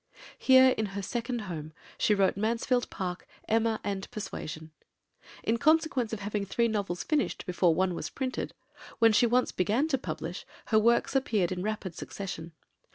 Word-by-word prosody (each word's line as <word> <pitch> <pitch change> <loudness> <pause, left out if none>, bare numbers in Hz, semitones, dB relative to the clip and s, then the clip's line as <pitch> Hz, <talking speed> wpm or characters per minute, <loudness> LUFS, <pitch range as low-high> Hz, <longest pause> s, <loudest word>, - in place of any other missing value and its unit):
Here 260 0 +7
in 220 - 0
her 200 - -3
second 240 +3 -3
home 160 -6 -6 0.2
she 210 - +2
wrote 195 -1 +3
Mansfield 230 +4 0
Park, 180 -2 -5 0.2
Emma, 225 0 +2
and 195 -1 -3
Persuasion. 160 -6 -6 0.7
In 230 +1 +1
consequence 310 -6 +2
of 220 -2 -4
having 205 0 -2
three 235 +4 +1
novels 200 -5 -2
finished 300 -2 -1
before 175 -2 +2
one 185 +1 +1
was 155 -2 -4
printed, 260 -2 -4 0.4
when 225 -1 +5
she 240 +3 +5
once 250 +2 +2
began 215 - +1
to 270 -4 +1
publish, - - -5 0.3
her 220 - +5
works 235 +4 +2
appeared 215 -10 +1
in 180 -1 -2
rapid 205 -3 -3
succession. 170 -2 -6
215 Hz, 160 wpm, -29 LUFS, 185-235 Hz, 0.7 s, Here